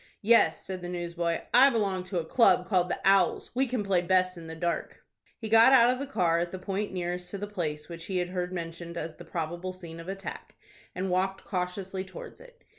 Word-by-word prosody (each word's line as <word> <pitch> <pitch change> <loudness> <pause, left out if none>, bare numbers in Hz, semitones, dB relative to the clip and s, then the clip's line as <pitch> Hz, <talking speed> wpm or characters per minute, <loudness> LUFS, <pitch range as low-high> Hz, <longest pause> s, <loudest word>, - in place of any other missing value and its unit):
"Yes," 230 +3 +4
said 185 -1 -5
the 175 - -6
newsboy. 170 -1 -2
"I 265 +3 +8
belong 200 -6 0
to 185 0 -4
a 165 - -1
club 185 -2 +4
called 185 -3 +2
'The - - -2
Owls.' 195 -2 +3
We 265 +2 +1
can 245 -3 -2
play 190 -3 +2
best 185 +1 +2
in 165 -1 -10
the 160 - -7
dark." 170 +1 -3 0.3
He 225 - -6
got 225 +4 +7
out 245 -2 +7
of 255 - -6
the 280 - -4
car 175 -10 +1
at 170 0 -2
the 185 - -5
point 195 +3 -3
nearest 180 -1 -4
to 200 - -5
the 205 - -4
place 155 -7 -4
which 170 -1 -8
he 190 - -2
had 180 0 -1
heard 180 -1 -3
mentioned 170 -1 -6
as 160 -1 -5
the - - -11
probable 175 +2 -4
scene 170 -3 -9
of 165 - -9
attack, 195 0 -7 0.4
and 185 0 -2
walked 190 +1 -1
cautiously 185 +1 -3
towards 190 0 -10
it. - - -17
185 Hz, 225 wpm, -28 LUFS, 175-200 Hz, 0.4 s, I